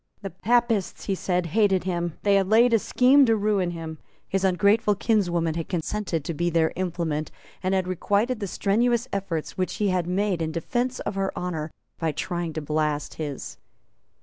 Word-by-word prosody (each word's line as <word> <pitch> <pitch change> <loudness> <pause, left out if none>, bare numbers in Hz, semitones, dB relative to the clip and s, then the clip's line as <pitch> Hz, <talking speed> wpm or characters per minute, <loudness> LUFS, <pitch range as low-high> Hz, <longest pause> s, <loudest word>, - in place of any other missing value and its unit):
The 195 - -4
Papists, 225 +2 +1
he 195 - 0
said, 180 -1 -1
hated 195 +1 +2
him; 175 -2 -2
they 200 - +3
had 195 -1 +3
laid 235 +2 +5
a 225 - +5
scheme 260 +6 +5
to 225 - +4
ruin 205 -4 +1
him; 165 -2 -6 0.3
his 195 0 -1
ungrateful 200 +3 +3
kinswoman 175 -6 +1
had 165 0 -4
consented 175 -2 -2
to 170 - -2
be 175 +3 0
their 165 -1 +2
implement, 170 -4 -2 0.3
and 190 0 0
had 185 -1 0
requited 205 +6 0
the 200 - -3
strenuous 235 +6 +1
efforts 185 -4 -3
which 185 - -1
he 205 -2 +1
had 180 -2 0
made 185 -1 0
in 160 -1 -1
defence 240 +10 -2
of 205 - -3
her 195 0 -1
honour 165 -3 -3 0.3
by 165 -2 0
trying 175 +1 -3
to 155 0 -4
blast 150 -1 -1
his. 145 -3 -5
185 Hz, 180 wpm, -25 LUFS, 165-210 Hz, 0.3 s, laid